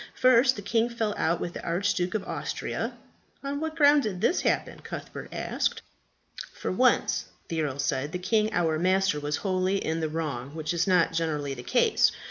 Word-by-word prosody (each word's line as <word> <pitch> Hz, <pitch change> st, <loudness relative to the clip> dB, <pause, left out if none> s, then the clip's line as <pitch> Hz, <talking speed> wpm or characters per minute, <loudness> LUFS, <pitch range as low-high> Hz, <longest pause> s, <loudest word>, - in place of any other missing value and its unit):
First, 255 Hz, +1 st, +5 dB
the 205 Hz, -, -7 dB
king 225 Hz, +3 st, +1 dB
fell 225 Hz, -3 st, -1 dB
out 170 Hz, +1 st, +1 dB
with 175 Hz, -, -4 dB
the -, -, -6 dB
Archduke 180 Hz, +1 st, 0 dB
of 210 Hz, -, -1 dB
Austria." -, -, -3 dB, 0.5 s
"On 280 Hz, +1 st, -3 dB
what 315 Hz, 0 st, -3 dB
ground 290 Hz, -2 st, +6 dB
did 205 Hz, -7 st, -3 dB
this 280 Hz, -, +2 dB
happen?" -, -, 0 dB
Cuthbert -, -, -8 dB
asked. -, -, -2 dB, 0.7 s
"For -, -, -4 dB
once," 250 Hz, +7 st, +2 dB, 0.2 s
the 165 Hz, -1 st, -1 dB
earl 140 Hz, -3 st, -2 dB
said, 140 Hz, +1 st, -1 dB
"the 180 Hz, -, -2 dB
king 215 Hz, +4 st, +1 dB
our 160 Hz, -3 st, +1 dB
master 185 Hz, -2 st, +2 dB
was 145 Hz, 0 st, -1 dB
wholly 185 Hz, 0 st, +1 dB
in 160 Hz, -3 st, -2 dB
the 160 Hz, -1 st, -1 dB
wrong, 150 Hz, -4 st, -4 dB
which 155 Hz, +1 st, -2 dB
is 170 Hz, +2 st, 0 dB
not 180 Hz, -3 st, +3 dB
generally 150 Hz, -4 st, -1 dB
the 125 Hz, -, -7 dB
case. -, -, +3 dB
180 Hz, 185 wpm, -27 LUFS, 160-220 Hz, 0.7 s, ground